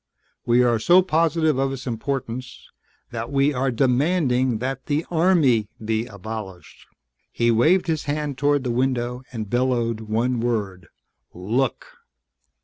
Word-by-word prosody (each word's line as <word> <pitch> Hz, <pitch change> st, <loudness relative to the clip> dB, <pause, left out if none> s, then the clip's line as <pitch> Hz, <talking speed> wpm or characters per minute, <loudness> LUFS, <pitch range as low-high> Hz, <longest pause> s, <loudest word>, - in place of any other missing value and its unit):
We 120 Hz, +1 st, +4 dB
are 120 Hz, -2 st, +2 dB
so 175 Hz, +10 st, +5 dB
positive 160 Hz, -4 st, +1 dB
of 135 Hz, 0 st, 0 dB
its 130 Hz, -2 st, -6 dB
importance 125 Hz, 0 st, -4 dB, 0.4 s
that 115 Hz, +1 st, -5 dB
we 140 Hz, +1 st, +2 dB
are 130 Hz, +1 st, 0 dB
demanding 130 Hz, 0 st, +1 dB
that 130 Hz, +3 st, -4 dB
the 150 Hz, +2 st, 0 dB
Army 160 Hz, -, +3 dB
be 110 Hz, +1 st, -2 dB
abolished!" 100 Hz, -3 st, -9 dB, 0.4 s
He 120 Hz, 0 st, +1 dB
waved 165 Hz, +12 st, +3 dB
his 160 Hz, -4 st, -2 dB
hand 145 Hz, -1 st, -2 dB
toward 145 Hz, 0 st, +1 dB
the 125 Hz, -, -1 dB
window 125 Hz, 0 st, -1 dB
and 110 Hz, -4 st, -5 dB
bellowed 120 Hz, -1 st, 0 dB
one 115 Hz, +3 st, -1 dB
word. 100 Hz, -8 st, -2 dB, 0.5 s
"LOOK!" 110 Hz, +10 st, -1 dB
125 Hz, 135 wpm, -23 LUFS, 115-145 Hz, 0.5 s, so